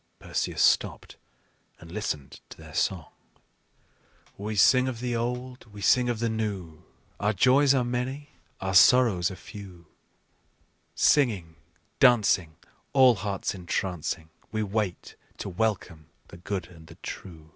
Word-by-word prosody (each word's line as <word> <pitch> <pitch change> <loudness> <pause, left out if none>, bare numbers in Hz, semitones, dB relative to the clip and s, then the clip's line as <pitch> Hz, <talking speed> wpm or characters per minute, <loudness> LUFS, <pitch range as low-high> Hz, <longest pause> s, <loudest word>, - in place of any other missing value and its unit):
Perseus - - -2
stopped - - +1 0.6
and 85 -1 -13
listened 80 -10 -4
to - - -12
their 80 -2 -13
song: 90 -2 -1 1.2
"We 105 +2 -5
sing 130 +5 +5
of 125 -3 -4
the 120 0 -2
old, 125 +2 -4
we 105 0 -10
sing 125 +6 +3
of 120 - -1
the 115 +1 -1
new, 100 -8 -4 0.4
Our 105 +1 +1
joys 130 +7 +4
are 130 - +2
many, 125 +4 -3 0.3
our 95 0 -3
sorrows 100 -3 +5
are 95 - -7
few; 90 -2 -12 1.1
Singing, 105 - +2 0.4
dancing, 105 - +4 0.4
All 130 -2 +7
hearts 100 -2 -3
entrancing, 90 -3 -3 0.2
We 110 -1 -1
wait 100 -3 -3 0.2
to - - -5
welcome 90 -6 -2 0.2
the - - -12
good 95 +2 -4
and 80 -3 -16
the - - -13
true. 80 -4 -9
105 Hz, 135 wpm, -27 LUFS, 90-120 Hz, 1.2 s, All